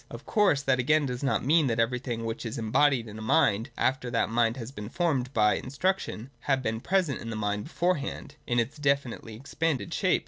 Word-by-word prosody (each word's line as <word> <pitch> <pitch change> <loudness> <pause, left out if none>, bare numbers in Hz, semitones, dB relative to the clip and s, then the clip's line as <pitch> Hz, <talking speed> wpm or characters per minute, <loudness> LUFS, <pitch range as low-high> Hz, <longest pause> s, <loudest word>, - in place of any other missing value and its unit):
Of - - -9
course 200 - +2
that 135 -2 +2
again 150 +4 +3
does 125 -2 -4
not 135 -3 0
mean 155 +1 +4
that 115 -2 0
everything 120 0 -1
which 115 +1 -4
is 115 -2 -5
embodied 120 +2 +2
in 110 0 -8
a - - -7
mind, 115 -2 +2
after 130 -1 0
that 115 -2 +1
mind 115 +1 +2
has 120 0 -6
been 105 -5 -7
formed 145 -6 0
by 105 -4 +3
instruction, 140 - -2
had 135 -2 0
been 110 -1 -1
present 180 -7 0
in 115 - -6
that 115 - -4
mind 105 -1 -2
beforehand, 170 -4 -2
in 120 - 0
its 120 +6 -2
definitely 140 -6 -1
expanded 145 +4 -2
shape. - - +2
130 Hz, 205 wpm, -28 LUFS, 115-145 Hz, -, mean